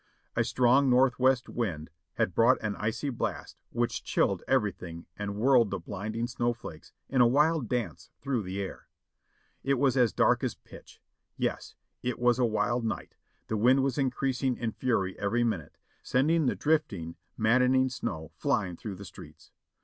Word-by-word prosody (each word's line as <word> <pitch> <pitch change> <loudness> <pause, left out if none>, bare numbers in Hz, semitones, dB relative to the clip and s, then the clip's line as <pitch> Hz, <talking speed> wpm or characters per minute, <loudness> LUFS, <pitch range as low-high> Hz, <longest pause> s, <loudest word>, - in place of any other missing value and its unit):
A - - +3
strong 130 +2 +3
northwest 130 0 +3
wind 85 -9 -3 0.2
had 90 - 0
brought 120 +6 +5
an 105 -1 -1
icy 115 +6 -2
blast 120 - -4
which 120 0 -2
chilled - - +1
everything 90 -5 -1
and 100 -1 -4
whirled 120 0 +4
the 95 - -2
blinding 110 +6 -4
snow 120 -1 -1
flakes 80 -9 -11 0.2
in 130 -2 +2
a 120 - +7
wild 150 0 +2
dance 110 - -3
through 135 -4 -1
the 95 0 -5
air. 95 -1 -6 0.8
It 135 0 +2
was 135 0 +2
as 125 -4 +4
dark - - +2
as - - -1
pitch - - -15 0.2
— - - -54
yes, - - -3 0.3
it 125 -1 -2
was 120 +1 +2
a 125 - +4
wild 115 +2 0
night; 110 -3 -4 0.3
the 110 - -2
wind 130 +5 +4
was 135 0 0
increasing 130 -1 0
in 115 -2 -2
fury 105 -7 -1
every 110 +4 +1
minute, 100 -11 -3 0.2
sending 150 +4 +2
the - - +1
drifting, 100 - 0 0.2
maddening 125 +4 +3
snow 80 - -5
frying 100 - -1
through 105 -3 -6
the 100 +2 -10
streets. - - -13
120 Hz, 165 wpm, -29 LUFS, 105-130 Hz, 0.8 s, a